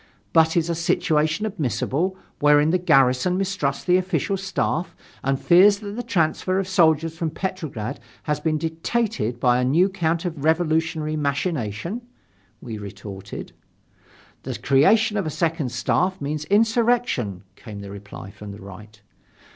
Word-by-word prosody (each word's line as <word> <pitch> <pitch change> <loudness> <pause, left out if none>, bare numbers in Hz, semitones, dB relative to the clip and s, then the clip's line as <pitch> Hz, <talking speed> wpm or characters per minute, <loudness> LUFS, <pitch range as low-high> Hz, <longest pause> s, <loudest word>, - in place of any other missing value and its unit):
"But 160 +1 +4
is 165 -1 +2
a 170 - 0
situation 165 +1 +1
admissible, 185 - -1 0.2
wherein 150 +1 +5
the 185 - +2
garrison 135 +1 +3
mistrusts 185 -8 -1
the 180 0 +4
official 185 0 -1
staff 190 -2 -2 0.3
and 135 0 0
fears 195 +4 +6
that 205 -1 -7
the 245 - -3
transfer 185 -4 0
of 195 -1 -1
soldiers 165 -3 +3
from 165 -1 -2
Petrograd 155 - -4 0.2
has 150 -1 -1
been 155 0 0
dictated 165 - -2
by 125 0 +3
a - - +1
new 165 +10 +3
counter 170 -1 -1
revolutionary 160 0 0
machination?" 145 - -2 0.6
we 110 -3 -6
retorted. 100 -1 -8 0.9
"The - - -5
creation 210 +11 +3
of 195 -5 -1
a - - 0
second 160 -4 -1
staff 180 +10 0
means 150 +1 -3
insurrection," 220 - +1
came 105 -2 -9
the 100 -1 -8
reply 100 -1 -9
from 100 0 -10
the 100 - -11
Right. 105 +2 -12
160 Hz, 140 wpm, -23 LUFS, 135-185 Hz, 0.9 s, fears